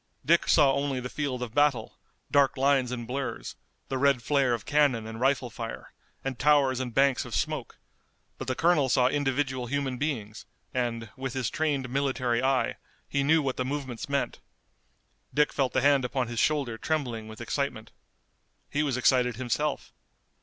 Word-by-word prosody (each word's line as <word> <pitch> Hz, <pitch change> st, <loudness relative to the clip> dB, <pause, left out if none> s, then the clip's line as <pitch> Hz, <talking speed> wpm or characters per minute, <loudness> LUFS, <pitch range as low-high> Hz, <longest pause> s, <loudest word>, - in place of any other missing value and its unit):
Dick -, -, +4 dB
saw 135 Hz, -2 st, +5 dB
only 140 Hz, -1 st, -1 dB
the 125 Hz, 0 st, -5 dB
field 135 Hz, -4 st, -2 dB
of 115 Hz, -3 st, -7 dB
battle, 145 Hz, -6 st, +1 dB, 0.3 s
dark 140 Hz, -2 st, +3 dB
lines 135 Hz, -2 st, +2 dB
and 120 Hz, -2 st, -4 dB
blurs, 135 Hz, +3 st, -4 dB, 0.3 s
the 130 Hz, -, -2 dB
red 140 Hz, -3 st, +3 dB
flare 135 Hz, -4 st, +2 dB
of 110 Hz, -, -9 dB
cannon 145 Hz, -7 st, +2 dB
and 110 Hz, 0 st, -7 dB
rifle 130 Hz, -1 st, +1 dB
fire, 115 Hz, 0 st, -7 dB, 0.3 s
and 135 Hz, -2 st, -4 dB
towers 140 Hz, -3 st, +4 dB
and 130 Hz, -2 st, -3 dB
banks 135 Hz, +1 st, +3 dB
of -, -, -6 dB
smoke, -, -, -2 dB, 0.6 s
but 130 Hz, -, -6 dB
the 130 Hz, -, -1 dB
colonel 160 Hz, -4 st, +3 dB
saw 125 Hz, +1 st, +4 dB
individual 135 Hz, -2 st, -1 dB
human 135 Hz, -1 st, -2 dB
beings, 120 Hz, -7 st, -4 dB, 0.3 s
and, 115 Hz, -3 st, -2 dB
with 130 Hz, -1 st, -4 dB
his 130 Hz, -4 st, -2 dB
trained 145 Hz, -4 st, 0 dB
military 130 Hz, -2 st, 0 dB
eye, 135 Hz, 0 st, +1 dB, 0.3 s
he 140 Hz, -, 0 dB
knew 155 Hz, +2 st, +3 dB
what 135 Hz, -2 st, -2 dB
the 130 Hz, -, 0 dB
movements 135 Hz, -1 st, -4 dB
meant. 140 Hz, -1 st, -1 dB, 1.0 s
Dick 150 Hz, 0 st, +3 dB
felt 135 Hz, -3 st, +1 dB
the 130 Hz, -, +1 dB
hand 140 Hz, 0 st, +4 dB
upon 125 Hz, 0 st, -1 dB
his 120 Hz, -1 st, -3 dB
shoulder 135 Hz, -7 st, +1 dB
trembling 125 Hz, -8 st, -2 dB
with 110 Hz, 0 st, -10 dB
excitement. 120 Hz, -2 st, -3 dB, 0.8 s
He 145 Hz, -, +1 dB
was 140 Hz, -4 st, 0 dB
excited 125 Hz, -1 st, +3 dB
himself. 135 Hz, +4 st, -2 dB
130 Hz, 170 wpm, -28 LUFS, 125-140 Hz, 1.0 s, saw